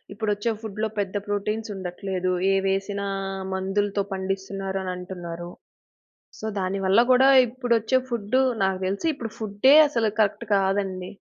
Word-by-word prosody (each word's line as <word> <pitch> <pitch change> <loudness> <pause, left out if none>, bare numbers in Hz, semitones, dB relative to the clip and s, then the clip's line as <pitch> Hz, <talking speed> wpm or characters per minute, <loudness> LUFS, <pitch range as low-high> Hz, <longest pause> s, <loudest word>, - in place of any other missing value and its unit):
ఇప్పుడొచ్చే 210 +1 -1
ఫుడ్‌లో 220 0 -3
పెద్ద 200 -1 -2
ప్రోటీన్స్ 210 +2 -2
ఉండట్లేదు. 185 0 -3 0.2
ఏవేసినా, 195 +1 -1 0.5
మందులతో 200 +2 0
పండిస్తున్నారని 195 0 -3
అంటున్నారు. 175 -2 -7 0.9
సో, - - -6
దాని 190 +1 -1
వల్ల 190 +4 +5
కూడా, 255 +1 +6 0.2
ఇప్పుడొచ్చే 235 0 +1
ఫుడ్డు 235 +2 +1 0.2
నాకు 190 -1 0
తెలిసి 200 - -2
ఇప్పుడు 230 -5 -6
ఫుడ్డే 220 +6 +4
అసలు 230 -6 +1
కరెక్ట్ 215 +2 0
కాదండి. 190 -1 0
200 Hz, 120 wpm, -24 LUFS, 190-220 Hz, 0.9 s, కూడా